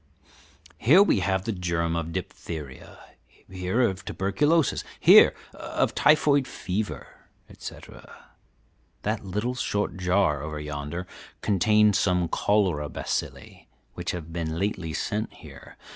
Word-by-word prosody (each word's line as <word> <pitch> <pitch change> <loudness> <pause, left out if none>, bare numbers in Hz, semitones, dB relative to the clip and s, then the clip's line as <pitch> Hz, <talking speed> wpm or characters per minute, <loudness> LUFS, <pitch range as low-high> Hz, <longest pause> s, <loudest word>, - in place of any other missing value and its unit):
"Here 170 - +6
we 205 - +2
have 95 0 0
the 115 - -1
germ 85 -3 -1
of 85 0 -3
diphtheria, 75 -4 -7 0.5
here 95 +5 -1
of 100 -6 0
tuberculosis, 145 - +1 0.2
here - - +7 0.2
of - - -2
typhoid 145 -3 +4
fever, 100 +2 -5 0.2
etc. - - -12 0.7
That 105 0 -2
little 105 +6 -2
short 105 -5 -2
jar 90 -5 +1
over 75 0 -5
yonder 75 +4 -5 0.4
contains 105 +1 +3
some 90 -3 +1
cholera 90 -8 +1
bacilli, - - -5 0.3
which - - -5
have 85 -2 -5
been 80 -2 -3
lately 90 -3 -2
sent 105 +7 -3
here. - - -14
95 Hz, 115 wpm, -26 LUFS, 85-105 Hz, 0.7 s, here